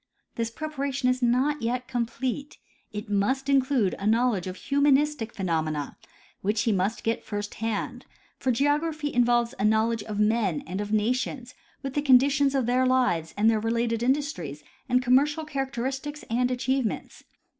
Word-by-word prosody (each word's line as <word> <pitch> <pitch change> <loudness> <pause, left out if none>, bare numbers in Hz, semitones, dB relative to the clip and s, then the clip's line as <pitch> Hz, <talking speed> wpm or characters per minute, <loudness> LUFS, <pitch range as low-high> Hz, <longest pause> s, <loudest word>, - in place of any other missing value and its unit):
This 230 -1 -2
preparation 280 -1 -2
is 255 0 0
not 255 +4 +2
yet 245 +2 -2
complete; 255 +3 -3 0.3
it 210 +2 -6
must 210 +7 0
include 265 -7 +2
a 200 - -2
knowl 235 +3 +3
edge 185 -1 -4
of 185 - -5
humanistic 285 -2 +2
phenomena 160 -6 -2 0.5
which 210 +3 0
he 225 - +2
must 195 +3 0
get 225 +1 -1
first 205 -1 -4
hand, 225 -2 -3 0.3
for 260 - +1
geography 295 +3 0
involves 240 0 +2
a - - 0
knowledge 220 +1 +2
of 210 0 -5
men 210 -6 +1
and 185 +4 -4
of 205 0 -5
nations, 245 +3 -1 0.3
with 270 -1 -4
the 290 - 0
conditions 275 +1 +4
of 265 -3 +1
their 255 +2 +2
lives 180 -11 +1
and 210 +2 +3
their 225 -1 +4
related 230 +1 0
industries 240 - -1 0.3
and 250 0 +3
commercial 290 +5 +3
characteristics 270 +1 -3
and 250 +2 +2
achievements. 255 -1 -2
245 Hz, 155 wpm, -26 LUFS, 215-270 Hz, 0.5 s, conditions